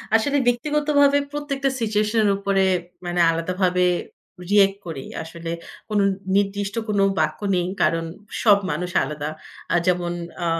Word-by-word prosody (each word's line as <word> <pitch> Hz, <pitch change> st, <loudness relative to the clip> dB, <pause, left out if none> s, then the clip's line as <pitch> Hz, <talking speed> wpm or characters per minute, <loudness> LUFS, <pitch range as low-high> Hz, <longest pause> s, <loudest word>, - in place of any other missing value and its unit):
আসলে 280 Hz, +6 st, +2 dB
ব্যক্তিগতভাবে 285 Hz, +2 st, +3 dB
প্রত্যেকটা 280 Hz, -2 st, -1 dB
সিচুয়েশন 215 Hz, 0 st, +1 dB
এর -, -, +4 dB
উপরে 195 Hz, -1 st, +1 dB, 0.4 s
মানে 175 Hz, 0 st, -2 dB
আলাদাভাবে 180 Hz, +2 st, 0 dB, 0.7 s
রিঅ্যাক্ট 200 Hz, -1 st, +4 dB
করি। 145 Hz, -5 st, -5 dB, 0.2 s
আসলে 165 Hz, +1 st, -8 dB, 0.4 s
কোনো 210 Hz, -2 st, +2 dB, 0.3 s
নির্দিষ্ট 200 Hz, 0 st, 0 dB
কোনো 205 Hz, -2 st, +2 dB, 0.2 s
বাক্য -, -, 0 dB, 0.2 s
নেই। 175 Hz, -1 st, +1 dB, 0.2 s
কারণ 165 Hz, 0 st, +2 dB, 0.4 s
সব 205 Hz, -3 st, +7 dB
মানুষ 180 Hz, 0 st, -3 dB
আলাদা। 150 Hz, +1 st, -4 dB, 0.6 s
যেমন 175 Hz, -1 st, +1 dB, 0.3 s
আ -, -, 0 dB
200 Hz, 125 wpm, -22 LUFS, 175-230 Hz, 0.7 s, সব